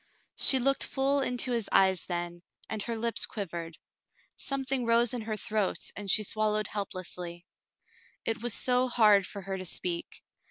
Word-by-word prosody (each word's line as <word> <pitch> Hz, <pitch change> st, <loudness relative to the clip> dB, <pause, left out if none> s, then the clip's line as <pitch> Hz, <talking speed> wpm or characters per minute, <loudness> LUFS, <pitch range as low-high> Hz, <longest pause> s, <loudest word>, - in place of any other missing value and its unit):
She 265 Hz, -, +6 dB
looked 275 Hz, +2 st, +2 dB
full 275 Hz, +1 st, +1 dB
into 250 Hz, -1 st, -1 dB
his 230 Hz, -4 st, -1 dB
eyes 190 Hz, -2 st, +3 dB
then, 175 Hz, -1 st, -4 dB, 0.3 s
and 220 Hz, -1 st, -4 dB
her 230 Hz, +2 st, -4 dB
lips 230 Hz, +1 st, +1 dB
quivered. 170 Hz, -5 st, -6 dB, 0.6 s
Something 270 Hz, -2 st, -1 dB
rose 235 Hz, 0 st, +3 dB
in 245 Hz, -, -3 dB
her 215 Hz, -1 st, -4 dB
throat, 210 Hz, -2 st, -1 dB
and 205 Hz, -1 st, -7 dB
she 215 Hz, +3 st, +3 dB
swallowed 215 Hz, 0 st, +1 dB
helplessly. 180 Hz, -3 st, -6 dB, 0.8 s
It 225 Hz, -1 st, -2 dB
was 240 Hz, -2 st, +1 dB
so 250 Hz, 0 st, +3 dB
hard 210 Hz, -5 st, +4 dB
for 200 Hz, -2 st, -8 dB
her 190 Hz, 0 st, -5 dB
to 185 Hz, -, -6 dB
speak. 170 Hz, 0 st, -2 dB
215 Hz, 160 wpm, -29 LUFS, 190-240 Hz, 0.8 s, She